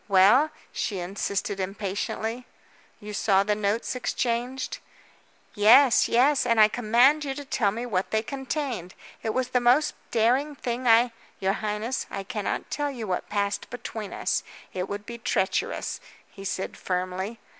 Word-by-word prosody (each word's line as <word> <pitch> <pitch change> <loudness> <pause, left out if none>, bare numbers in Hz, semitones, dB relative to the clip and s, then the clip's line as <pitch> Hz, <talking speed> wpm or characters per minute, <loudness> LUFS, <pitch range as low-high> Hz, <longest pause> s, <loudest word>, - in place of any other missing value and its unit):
"Well?" 210 +10 +6 0.2
she 200 - -2
insisted 195 +2 -3
impatiently. 205 +5 -3 0.5
"You 210 -1 -8
saw 195 -1 +3
the 210 +1 +1
notes 210 +2 -1
exchanged?" 250 +1 -2 0.7
"Yes, 235 +5 +6
yes, 270 +4 +4
and 230 -2 +2
I 215 0 +8
command 245 +7 +4
you 270 -2 -3
to 285 0 -7
tell 235 -6 +1
me 230 +5 -4
what 195 -6 -1
they 220 0 0
contained. 265 - -4 0.3
It 220 - -1
was 255 +2 -1
the 250 - +2
most 250 +5 +3 0.2
daring 255 +6 +2
thing 250 -1 -3
I 235 +1 +6
" - - -30
"You 195 0 +1
highness, 215 +4 -3
I 195 - -5
cannot 210 0 -3
tell 290 -1 -1
you 245 -5 -5
what 185 -3 -3
passed 200 -1 -1
between 220 -4 -6
us. - - -1 0.3
It 185 0 -3
would 205 0 -5
be 235 +1 -8
treacherous," 235 - -1 0.3
he 195 - -10
said 190 -1 -3
firmly. 185 +4 -3
225 Hz, 155 wpm, -26 LUFS, 200-250 Hz, 0.7 s, I